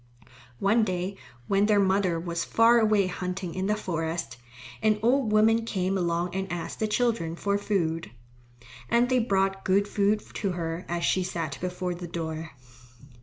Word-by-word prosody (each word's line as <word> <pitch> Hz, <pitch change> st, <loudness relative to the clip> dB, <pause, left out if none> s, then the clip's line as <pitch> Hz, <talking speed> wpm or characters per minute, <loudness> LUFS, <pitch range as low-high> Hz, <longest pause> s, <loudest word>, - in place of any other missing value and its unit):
One 215 Hz, -, +3 dB
day, 185 Hz, -1 st, -2 dB, 0.3 s
when 200 Hz, +1 st, +3 dB
their 210 Hz, -1 st, +4 dB
mother 190 Hz, -3 st, +2 dB
was 170 Hz, 0 st, -3 dB
far 230 Hz, +1 st, +5 dB
away 215 Hz, -3 st, +3 dB
hunting 180 Hz, -1 st, -4 dB
in 190 Hz, +1 st, -2 dB
the 210 Hz, -, +2 dB
forest, 165 Hz, -6 st, -3 dB, 0.4 s
an 215 Hz, -1 st, +3 dB
old 245 Hz, -1 st, +3 dB
woman 225 Hz, +2 st, +4 dB
came 190 Hz, -3 st, -1 dB
along 175 Hz, -1 st, -1 dB
and 190 Hz, 0 st, -3 dB
asked 175 Hz, -1 st, -5 dB
the 220 Hz, -, +1 dB
children 215 Hz, -7 st, 0 dB
for 200 Hz, +3 st, -1 dB
food. 165 Hz, -, -1 dB, 0.8 s
And 240 Hz, +1 st, +3 dB
they 255 Hz, -1 st, +3 dB
brought 195 Hz, -3 st, +1 dB
good 200 Hz, +2 st, +2 dB
food 205 Hz, +1 st, +1 dB
to 195 Hz, -4 st, -2 dB
her 165 Hz, 0 st, -4 dB
as 170 Hz, 0 st, -2 dB
she 185 Hz, -, +2 dB
sat 165 Hz, -5 st, -4 dB
before 180 Hz, 0 st, -2 dB
the 175 Hz, 0 st, -7 dB
door. 160 Hz, -1 st, -4 dB
190 Hz, 165 wpm, -27 LUFS, 175-210 Hz, 0.8 s, far